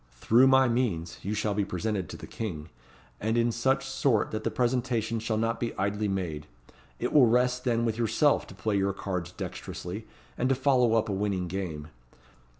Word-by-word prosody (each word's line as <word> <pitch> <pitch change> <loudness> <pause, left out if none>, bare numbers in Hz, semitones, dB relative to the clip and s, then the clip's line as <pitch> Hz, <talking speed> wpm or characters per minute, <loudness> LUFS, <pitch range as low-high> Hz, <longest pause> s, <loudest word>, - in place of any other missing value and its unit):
Through 115 - +4
my 130 0 +5
means 110 -9 -1
you 105 +3 -3
shall 105 0 0
be 100 0 +1
presented 95 -1 -2
to - - -7
the - - -9
king, 85 -8 -5 0.5
and 110 +2 0
in 120 0 +3
such 130 +4 +1
sort 130 -4 +1
that 110 0 -3
the - - +1
presentation 120 -2 0
shall 110 0 -1
not 115 +1 0
be 120 - -3
idly 100 +2 0
made. 85 -6 -3 0.5
It 125 - -2
will 135 -5 +7
rest 125 +2 +2
then 115 -1 +1
with 115 0 -1
yourself 120 +6 +2
to 95 - -12
play 105 +3 -1
your 100 0 +1
cards 90 -3 -4
dexterously, 90 +3 -6 0.3
and 125 - +1
to 135 - +3
follow 130 -3 +3
up 110 0 +2
a 100 - -2
winning 95 -2 -1
game. 85 -5 -5
110 Hz, 190 wpm, -28 LUFS, 95-120 Hz, 0.5 s, will